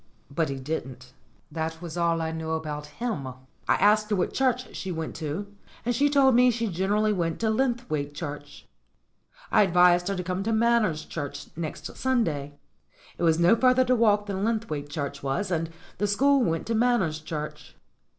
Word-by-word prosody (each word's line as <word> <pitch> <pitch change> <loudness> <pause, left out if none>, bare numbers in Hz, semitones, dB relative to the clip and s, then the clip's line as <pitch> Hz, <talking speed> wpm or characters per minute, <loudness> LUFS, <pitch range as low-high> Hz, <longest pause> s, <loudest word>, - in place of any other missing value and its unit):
But 155 +2 0
he 135 - -3
didn't. 130 -3 -6 0.4
That 160 0 -3
was 170 -1 -7
all 170 -1 +1
I 160 - -2
knew 160 0 -3
about 150 -2 -4
him. 195 - -4
I 130 - -7 0.4
asked 210 +2 +3
her 210 - +2
what 185 - -1
church 255 -1 0
she 190 - -4
went 160 -2 -4
to, 165 +7 -5 0.3
and 245 - +1
she 285 +5 +3
told 275 -2 +5
me 250 +1 +6
she 230 -2 -1
generally 205 +4 +1
went 165 -4 -1
to 220 -1 +2
Linthwaite 220 - -1
Church. 145 -2 -7 0.8
I - - +5
advised 180 -2 +4
her 200 - -1
to 180 - -3
come 180 +1 -2
to 220 +3 -1
Manners 220 -8 +2
Church 145 -2 -6
next 155 -2 -6
Sunday; 160 - 0 0.6
it - - -6
was 165 -2 +4
no 170 +5 +5
farther 255 +2 +4
to 250 0 +3
walk 210 -3 +3
than 195 -1 -3
Linthwaite 215 -11 -2
Church 140 -2 -4
was, 140 +8 -2
and 165 -1 -1 0.3
the 205 - +1
school 275 +7 +3
went 165 -6 -1
to 230 - -2
Manners 220 -9 +2
Church. 155 -1 -7
180 Hz, 180 wpm, -26 LUFS, 155-225 Hz, 0.8 s, me